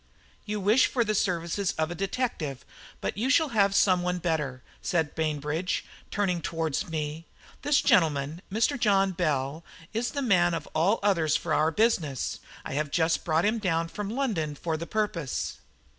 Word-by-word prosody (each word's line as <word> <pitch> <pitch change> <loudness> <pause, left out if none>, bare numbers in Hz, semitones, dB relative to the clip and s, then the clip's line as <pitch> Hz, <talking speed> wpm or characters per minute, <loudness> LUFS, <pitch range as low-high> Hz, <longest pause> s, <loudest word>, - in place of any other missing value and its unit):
"You 210 0 -2
wish 215 +6 +4
for 240 - +1
the 215 - 0
services 185 0 0
of 160 +1 -1
a - - -2
detective, 180 - -3 0.4
but - - -3
you 250 +4 0
shall 310 +2 +4
have 200 -4 +3
some 185 -3 +4
one 180 0 -1
better," 150 -7 -2 0.2
said 160 -4 0
Bainbridge, 155 +2 -1 0.2
turning 185 -5 0
towards 165 -1 -2
me. 155 0 -4 0.3
"This 290 0 +3
gentleman, 155 0 +2
Mr. 230 +7 +1
John 195 -3 +3
Bell, 155 -3 -1 0.3
is 235 +2 0
the 280 -1 -3
man 175 -7 +3
of 160 -2 -5
all 180 +8 +2
others 165 -7 +3
for 160 -1 -1
our 155 +1 +3
business. 165 - 0 0.3
I - - -4
have 150 +1 -1
just 160 +2 +1
brought 160 +1 +2
him 220 +2 +1
down 165 -4 0
from 205 +3 -5
London 210 - -1
for 160 +2 -2
the 165 +2 -5
purpose." 185 - -2
175 Hz, 170 wpm, -27 LUFS, 155-205 Hz, 0.4 s, wish